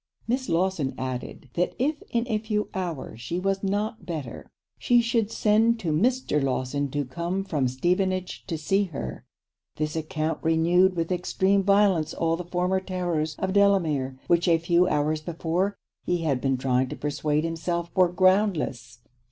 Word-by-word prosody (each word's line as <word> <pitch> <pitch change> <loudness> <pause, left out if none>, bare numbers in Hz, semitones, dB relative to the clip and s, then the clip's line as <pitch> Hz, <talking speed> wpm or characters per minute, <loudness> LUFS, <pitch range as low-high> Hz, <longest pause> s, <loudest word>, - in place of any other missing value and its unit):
Miss 255 +2 -1
Lawson 165 -6 0
added, 130 0 -5
that 180 - 0
if 295 +4 0
in 235 +1 0
a 220 -3 0
few 210 -1 -2
hours 165 -11 -4
she 170 +8 -3
was 195 +1 0
not 205 +2 -1
better, 155 -9 -6 0.3
she 240 -1 +4
should 230 -2 +1
send 225 +2 +3
to 165 - -1
Mr. 220 - +1
Lawson 135 +1 -1
to 145 +1 -2
come 170 +8 -3
from 150 -9 0
Stevenage 180 +7 -1
to 165 - -2
see 195 +6 +1
her. 65 - -7 0.5
This 155 0 -2
account 155 0 -2
renewed 170 +3 +3
with 165 +1 -2
extreme 190 +2 +1
violence 195 -5 +3
all 165 0 +1
the 180 - -5
former 180 +2 0
terrors 175 -5 -2
of 190 +3 -2
Delamere, 165 -10 +2
which 170 0 +2
a 165 -1 +5
few 170 +2 +2
hours 155 -1 0
before 170 +4 -1 0.3
he 175 -1 -1
had 140 -5 0
been 135 -1 +1
trying 130 0 +1
to - - -5
persuade 150 +1 -1
himself 170 +1 -2
were 185 -2 +4
groundless. 180 - +1
170 Hz, 160 wpm, -26 LUFS, 150-195 Hz, 0.5 s, a